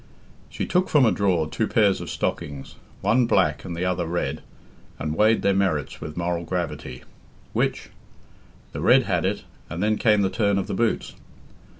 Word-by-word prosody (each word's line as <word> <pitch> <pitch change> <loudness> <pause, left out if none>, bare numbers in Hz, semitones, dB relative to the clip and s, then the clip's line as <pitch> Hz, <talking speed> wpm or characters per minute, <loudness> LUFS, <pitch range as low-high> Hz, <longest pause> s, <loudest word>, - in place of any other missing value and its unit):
She - - -4
took 185 +1 +1
from 145 -4 +5
a 110 - +4
drawer 90 -6 +1
two 110 +7 -1
pairs 100 -4 +2
of - - -6
stockings, 70 -2 -4 0.3
one 115 +5 +3
black 75 -10 +2
and 85 -3 -6
the 90 - -1
other 90 -2 -1
red, 85 +1 -2 0.6
and 75 +1 -3
weighed 110 +4 +3
their 100 - +3
merits 85 -8 -1
with 75 +1 -7
moral 85 0 -1
gravity 85 -7 -4 0.5
which? - - -1 0.8
The - - -5
red - - +5
had - - 0
it, - - -1 0.3
and 85 +5 -3
then 110 0 +1
came 105 -3 +4
the 95 - 0
turn 100 -3 +1
of 100 - -1
the - - -4
boots. 115 -1 0
95 Hz, 180 wpm, -24 LUFS, 80-105 Hz, 0.8 s, from